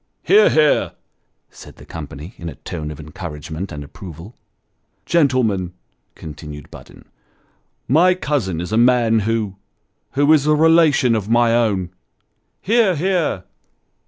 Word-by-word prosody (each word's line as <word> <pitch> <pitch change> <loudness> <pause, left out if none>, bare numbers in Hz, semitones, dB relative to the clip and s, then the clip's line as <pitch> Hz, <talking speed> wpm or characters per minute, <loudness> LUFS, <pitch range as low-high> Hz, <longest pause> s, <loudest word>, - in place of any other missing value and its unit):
" - - -50
Hear! 425 +2 +5
hear! 155 -2 +2 0.3
" - - -48 0.3
said - - -14
the - - -15
company, 80 +1 -9
in 85 - -6
a 75 - -10
tone 75 +2 -7
of 75 - -8
encouragement 80 +2 -7
and 75 -1 -7
approval. 85 +4 -11 0.8
Toasts. - - -16
241 130 -8 +3
"Gentlemen," 90 -1 -6 0.4
continued 75 -2 -10
Budden, - - -14 0.8
"my 175 +8 +4
cousin 135 - -2
is 90 +3 -5
a 110 - +1
man 120 -2 +3
who 110 -4 -2 0.6
who 145 +3 +4
as 150 -1 +2
a 150 - +4
relation 155 -6 +4
of 105 -1 -3
my 120 0 +3
own." 100 -7 0 0.7
(Hear! 220 -3 +2
hear!) 170 - -1
115 Hz, 145 wpm, -19 LUFS, -, 0.8 s, Hear